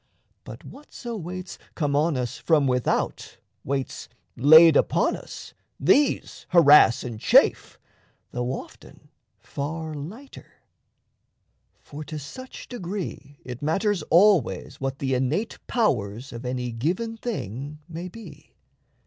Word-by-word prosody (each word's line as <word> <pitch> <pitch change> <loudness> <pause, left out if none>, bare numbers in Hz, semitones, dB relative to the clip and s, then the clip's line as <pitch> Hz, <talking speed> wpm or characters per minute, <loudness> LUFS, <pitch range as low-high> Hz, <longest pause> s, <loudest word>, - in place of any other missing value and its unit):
But - - -11
whatso 250 -4 -9
weights 180 -1 -7 0.2
come 145 -3 -1
on 150 0 +1
us 125 -1 -4
from 155 -4 +2
without, 125 -2 -1 0.3
Weights 135 -1 -4 0.3
laid 160 +5 +8
upon - - +2
us, - - -10 0.3
these 290 0 +1
harass 150 -9 +6
and 120 -3 -6
chafe, - - +3 0.5
Though 125 0 -2
often - - -10 0.3
far 160 +2 -5
lighter. 195 - -10 1.3
For 150 +1 -9
to 155 - -6
such 255 - -10
degree 180 - -6
It 125 0 -7
matters 190 +6 0
always 170 - +3
what 135 0 -3
the 135 -2 -2
innate 135 - -1
powers 120 - -1
Of 120 +2 -7
any 125 -1 -3
given 180 - -2
thing 145 - -5
may 170 +1 -7
be. 225 +5 -13
150 Hz, 115 wpm, -24 LUFS, 130-185 Hz, 1.3 s, laid